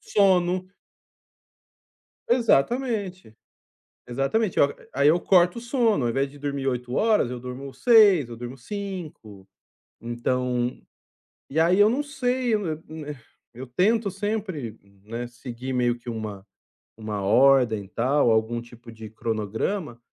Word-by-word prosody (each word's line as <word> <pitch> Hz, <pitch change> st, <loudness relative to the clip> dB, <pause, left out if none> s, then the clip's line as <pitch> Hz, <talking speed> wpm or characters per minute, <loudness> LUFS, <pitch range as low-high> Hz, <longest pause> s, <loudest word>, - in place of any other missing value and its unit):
sono 185 Hz, -2 st, +2 dB, 1.6 s
Exatamente, 225 Hz, -, +1 dB, 0.7 s
exatamente. 135 Hz, -, -1 dB
Ó, 140 Hz, -, +5 dB, 0.3 s
aí 140 Hz, +2 st, +4 dB
eu 170 Hz, +3 st, +4 dB
corto 180 Hz, +2 st, +3 dB
o -, -, -6 dB
sono, 235 Hz, -, +1 dB
ao 120 Hz, -, +1 dB
invés 135 Hz, +3 st, -1 dB
de 145 Hz, -, -14 dB
dormir 140 Hz, -1 st, -3 dB
8 125 Hz, -1 st, -2 dB
horas, 215 Hz, -, +2 dB
eu 125 Hz, -, -5 dB
durmo 125 Hz, +2 st, -7 dB
6, 200 Hz, -, +5 dB
eu 115 Hz, -, -8 dB
durmo 120 Hz, +3 st, -7 dB
5, 155 Hz, -, -7 dB, 0.5 s
então 125 Hz, +1 st, -2 dB, 0.7 s
e 150 Hz, -, -2 dB
aí 175 Hz, +4 st, +4 dB
eu 210 Hz, +2 st, +6 dB
não 270 Hz, +5 st, 0 dB
sei, 255 Hz, -4 st, -1 dB
eu 210 Hz, -3 st, -1 dB
eu 155 Hz, -1 st, -4 dB
n 155 Hz, -1 st, -7 dB
eh, 150 Hz, -, -6 dB, 0.4 s
eu 130 Hz, +3 st, -8 dB
tento 200 Hz, -, +1 dB
sempre, 190 Hz, -, -4 dB, 0.3 s
né, 115 Hz, +3 st, -5 dB
seguir 125 Hz, +1 st, -7 dB
meio 120 Hz, -1 st, +1 dB
que 120 Hz, -, -13 dB
uma 105 Hz, -4 st, -6 dB, 0.5 s
uma 105 Hz, -2 st, -4 dB
ordem 120 Hz, -1 st, +4 dB
e -, -, -16 dB
tal, 130 Hz, +4 st, +2 dB
algum 110 Hz, +1 st, +1 dB
tipo 120 Hz, 0 st, -14 dB
de 110 Hz, -1 st, -10 dB
cronograma, 115 Hz, -, -3 dB
135 Hz, 140 wpm, -25 LUFS, 120-195 Hz, 1.6 s, eu